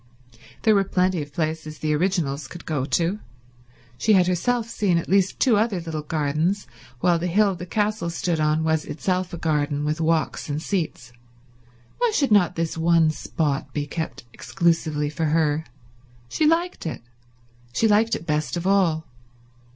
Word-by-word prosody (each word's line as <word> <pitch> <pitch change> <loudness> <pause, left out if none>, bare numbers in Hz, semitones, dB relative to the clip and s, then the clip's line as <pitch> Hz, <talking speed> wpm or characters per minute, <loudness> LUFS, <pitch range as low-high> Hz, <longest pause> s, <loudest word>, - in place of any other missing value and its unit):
There 220 - +5
were 200 -1 +4
plenty 185 -2 +1
of 145 0 -8
places 155 0 -3
the 155 -1 -1
originals 155 -5 0
could 175 +5 -11
go 145 -5 -1
to—she 125 - -3
had 185 -3 +5
herself 225 +7 0
seen 200 -6 +1
at 170 - -2
least 195 0 +2
two 245 -6 +4
other 210 -3 +1
little 160 -2 -4
gardens, 155 +6 -1 0.4
while 175 -2 +3
the 175 - -2
hill 200 +3 +3
the 180 0 -8
castle 210 -2 -1
stood 170 0 -1
on 155 +1 +2
was 160 -1 +1
itself 180 +3 -2
a 170 - -5
garden, 150 -2 0
with 155 +2 -1
walks 160 -1 0
and 145 +1 -1
seats. 160 - -3 0.9
Why 485 -1 +3
should 275 -5 +1
not 200 -5 +4
this 165 0 -2
one 165 -1 +4
spot 150 -2 -2
be 145 -1 -1
kept 160 +2 -5
exclusively 160 -3 0
for 160 +1 -2
her? 155 0 +1 0.6
She 305 - +1
liked 335 - 0
it; 155 - -5 0.7
she 225 - +2
liked 220 +2 +3
it - - -7
best 155 +2 -1
of 170 - -4
all. 180 -5 +2
165 Hz, 165 wpm, -23 LUFS, 150-190 Hz, 0.9 s, There